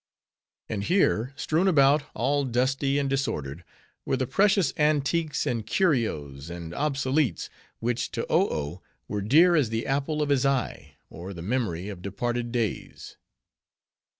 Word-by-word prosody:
And 105 -2 -3
here, 135 - +2
strewn 160 +4 +1
about, 145 -4 +5
all 140 +5 +1
dusty 135 +2 0
and 140 -1 0
disordered, 90 - -2 0.4
were 135 - 0
the 130 - 0
precious 195 - +2
antiques, 150 +1 +1
and 120 -6 -1
curios, 105 - -1
and 85 -1 -7
obsoletes, 135 - 0 0.3
which 120 +1 -1
to - - -2
Oh - - +3
Oh 75 +4 -4 0.3
were 105 - -3
dear 160 - +5
as 145 -8 +2
the 115 0 -2
apple 145 +3 0
of 145 - -3
his 140 -3 +2
eye, 135 -4 -1 0.2
or 90 +4 -8
the 85 - -7
memory 105 -5 -2
of 100 -4 -7
departed 120 +5 -3
days. 115 -4 -4
130 Hz, 145 wpm, -26 LUFS, 105-145 Hz, 0.4 s, about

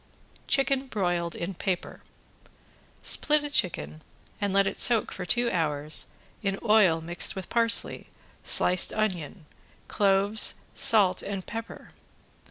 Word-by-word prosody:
~CHICKEN 275 -1 0
BROILED 175 -6 -2
IN 175 +3 -5
PAPER~ 185 0 -4 1.0
Split 300 -1 +1
a 290 - -6
chicken 80 - -2 0.4
and 200 -1 -1
let 195 0 +3
it - - -4
soak 230 -3 +3
for 180 -1 -7
two 240 +6 +2
hours 155 -3 -2 0.3
in 195 -2 -2
oil 210 -7 +3
mixed 170 +2 -1
with 190 -2 -7
parsley, 230 -1 0 0.4
sliced 180 0 +4
onion, 185 -6 -3 0.4
cloves, 200 +1 +2 0.2
salt 200 -5 +4
and 195 -2 -6
pepper. 225 0 -9
195 Hz, 120 wpm, -26 LUFS, 175-220 Hz, 1.0 s, sliced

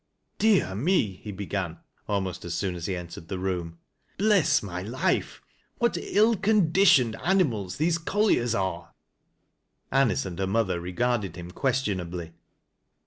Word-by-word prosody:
" - - -49
Dear 190 - +3
me! 120 - +1
" - - -25
he 105 - -5
began, 95 -3 -4 0.3
almost 95 -3 -2
as 85 -1 -4
soon 95 -2 -1
as 85 -1 -5
he 95 - -1
entered 85 -2 -8
the 95 - -4
room. 90 -3 -3 0.2
" - - -41
Bless 205 - +3
my 90 -2 -5
life! 115 +7 -1 0.3
what 235 0 +1
ill 220 +3 +3
conditioned 180 - +4
aniinali 130 - +1
these 165 +2 +1
colliers 165 - +1
are! 95 -4 -3 0.5
" - - -48
Anice 115 -9 +1
and 90 -2 -6
her 95 - 0
mother 95 -3 0
regarded 100 0 -1
him 90 0 -8
qnestionably. 90 - -2
100 Hz, 150 wpm, -26 LUFS, -, 0.5 s, conditioned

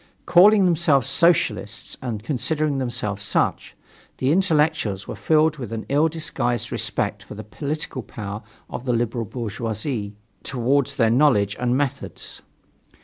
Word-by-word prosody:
Calling 200 +3 +6
themselves 160 -6 +3
Socialists, 115 - +1
and 115 -5 -4
considering 150 +2 0
themselves 105 -5 -3
such, 100 - -1 0.4
the 130 +2 +1
intellectuals 155 - +1
were - - -5
filled 155 -1 +2
with 120 -6 -7
an 115 -1 -4
ill 145 +3 +3
disguised 150 -7 -2
respect - - -1
for - - -11
the - - -7
political 145 +4 -4
power 105 -2 -7 0.3
of 125 - -7
the 125 - +1
liberal 115 0 -1
bourgeoisie, 110 0 -4 0.3
towards 135 +2 0
their 115 -5 +3
knowledge 115 -7 +3
and 125 +1 +1
methods. 140 -1 -3
130 Hz, 135 wpm, -23 LUFS, 110-150 Hz, 0.4 s, Calling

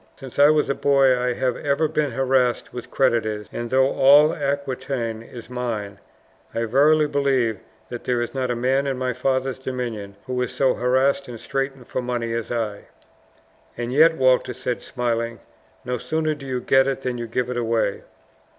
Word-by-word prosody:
"Since 135 0 -9
I 145 +1 +8
was 155 -1 +3
a - - +1
boy 135 -2 +4
I 125 0 0
have 125 0 -1
ever 145 +2 +1
been 150 -1 0
harassed 130 -1 +1
with 125 - -7
creditors; 110 -5 +1
and 120 0 -4
though 130 +2 +3
all 145 +3 +6
Aquitaine 135 -5 -3
is 115 0 -11
mine, 115 -6 -4 0.6
I 115 - 0
verily 150 +6 +4
believe 135 -7 +1 0.3
that 120 - -7
there 125 -1 +1
is 120 - -3
not 130 -2 -2
a 120 - 0
man 130 +3 +1
in 135 -2 -1
my 130 0 -1
father's 130 +1 -1
dominions 120 -6 -5
who 125 -1 -2
is 125 - -1
so 135 -2 +2
harassed 130 +3 +1
and 120 -2 -8
straitened 135 0 -3
for 130 - -3
money 120 -2 -2
as 115 -1 -3
I." 110 -4 -3 0.9
"And 120 +1 -3
yet," 160 +3 +5
Walter 130 -1 +2
said, 125 -1 -3
smiling, 115 -2 -2 0.5
"no 125 -1 -2
sooner 155 +2 -1
do 140 -2 -10
you 130 -1 -2
get 135 +2 +4
it 135 -1 -2
than 125 -2 -3
you 120 - -4
give 125 +2 -2
it 125 - -3
away." 115 -4 0
125 Hz, 185 wpm, -23 LUFS, 120-135 Hz, 0.9 s, I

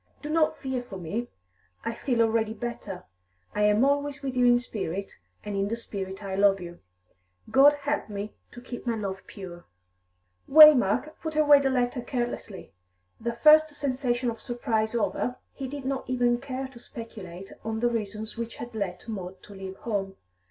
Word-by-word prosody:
Do 300 - -4
not 315 -1 +2
fear 265 -2 -3
for 220 -6 -9
me; 200 +8 -3 0.6
I 230 - -1
feel 235 -1 +1
already 225 -1 +1
better. 215 -5 -6 0.5
I 210 - -1
am 210 +4 +4
always 285 0 0
with 265 -2 -3
you 250 -1 +4
in 240 0 +6
spirit, 200 -6 -5 0.2
and 205 -1 -4
in 195 0 0
the 225 - -1
spirit 195 -4 -6
I 195 -1 -4
love 195 0 +4
you; 175 -1 -9 0.7
God 280 +2 +7
help 290 -4 -1
me 205 +1 -5 0.2
to 240 - -10
keep 245 0 -8
my 235 - +1
love 195 -3 -4
pure!" 175 -4 -9 0.8
Waymark 300 -2 +7
put 315 -1 -4
away 295 -2 +7
the 275 -1 +1
letter 245 -1 0
carelessly; 240 - -4 0.5
the 235 +1 -2
first 310 0 +8
sensation 255 -3 0
of 225 - -9
surprise 225 -2 -1
over, 240 +2 0 0.2
he 270 - -5
did 280 0 -7
not 265 -1 -3
even 245 -1 +2
care 265 -1 -4
to 255 -3 -14
speculate 195 -6 -9
on 220 0 -2
the 240 - +2
reasons 215 -1 -4
which 230 0 -5
had 240 0 -8
led 190 -4 -3
Maud 190 -4 -6
to 205 - -12
leave 190 -1 -7
home. 195 -4 -3
235 Hz, 175 wpm, -27 LUFS, 200-260 Hz, 0.8 s, first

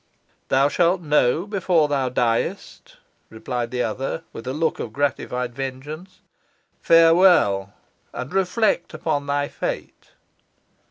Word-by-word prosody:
"Thou 135 +1 +3
shalt 175 +5 +2
know 150 +1 +2
before 185 -6 +1
thou 135 -3 0
diest," 120 -2 -2 0.3
replied 120 +1 -4
the 125 0 -1
other, 135 +1 -3
with 115 - -9
a - - -1
look 160 +2 -1
of 110 - -5
gratified 125 -3 -2
vengeance. 135 +7 -7 0.6
"Farewell, 165 - +4 0.4
and 130 - -7
reflect 195 +3 0
upon 145 -3 -2
thy 145 0 0
fate." - - -6
145 Hz, 115 wpm, -22 LUFS, 125-165 Hz, 0.6 s, Farewell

